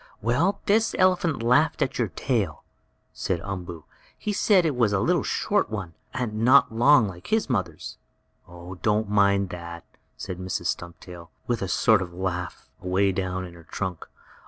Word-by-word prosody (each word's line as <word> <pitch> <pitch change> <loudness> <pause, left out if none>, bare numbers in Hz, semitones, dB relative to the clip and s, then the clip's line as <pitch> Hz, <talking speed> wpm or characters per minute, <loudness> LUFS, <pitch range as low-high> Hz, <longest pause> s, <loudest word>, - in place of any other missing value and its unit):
"Well, 165 - +1
this 220 +2 +2
elephant 175 -8 +2
laughed 135 +7 +3
at 135 0 -4
your 120 - +2
tail," 100 - -2 0.5
said 90 - -2
Umboo. 90 -5 -6 0.3
"He 210 - -3
said 195 -3 +3
it 150 -4 0
was 115 -4 +2
a 100 - +2
little - - +2
short - - 0
one, 100 -6 -5 0.2
and 110 -4 -3
not 130 -1 +5
long 120 0 +5
like 90 -1 -10
his 220 -10 0
mother's!" 100 -7 -3 0.8
"Don't 105 -1 +1
mind 100 -2 +3
that!" 85 -1 -8 0.3
said 95 -2 -6
Mrs. 90 -1 -4
Stumptail, 85 0 -11 0.2
with 120 -2 -1
a 95 - -2
sort 105 +2 +3
of 85 -2 -6
laugh 90 -1 -4
away 95 +2 +1
down 95 0 -3
in 90 - -11
her 85 -1 -15
trunk. 90 -2 -5
100 Hz, 160 wpm, -25 LUFS, 90-125 Hz, 0.8 s, not